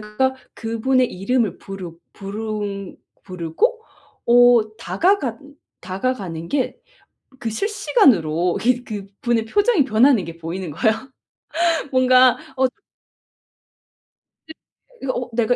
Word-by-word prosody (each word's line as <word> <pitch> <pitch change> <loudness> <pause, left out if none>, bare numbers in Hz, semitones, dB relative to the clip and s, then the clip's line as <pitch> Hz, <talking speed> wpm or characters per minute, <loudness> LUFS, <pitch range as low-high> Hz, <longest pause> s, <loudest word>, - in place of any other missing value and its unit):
제가 215 +5 -1 0.2
그분의 240 +3 0
이름을 215 +3 0
부르 190 -3 -8 0.2
부르 205 -1 -5 0.3
부르고 185 - -1 0.4
어 235 -3 +5
다가간 285 - -1 0.3
다가가는 185 -4 -4
게 275 -3 -1 0.6
그 230 - -4
실시간으로 215 - +2
이게 245 +1 +2
그분의 215 +2 -3
표정이 410 - +3
변하는 240 -2 +4
게 165 0 -8
보이는 170 +1 -5
거예요. 220 - +2 1.0
뭔가 255 -1 +5 0.2
어 260 - +3 1.8
이 - - -7 0.5
이거 255 - -1
어 245 0 -4
'내가 235 +1 +2
225 Hz, 220 characters per minute, -21 LUFS, 195-255 Hz, 1.8 s, 어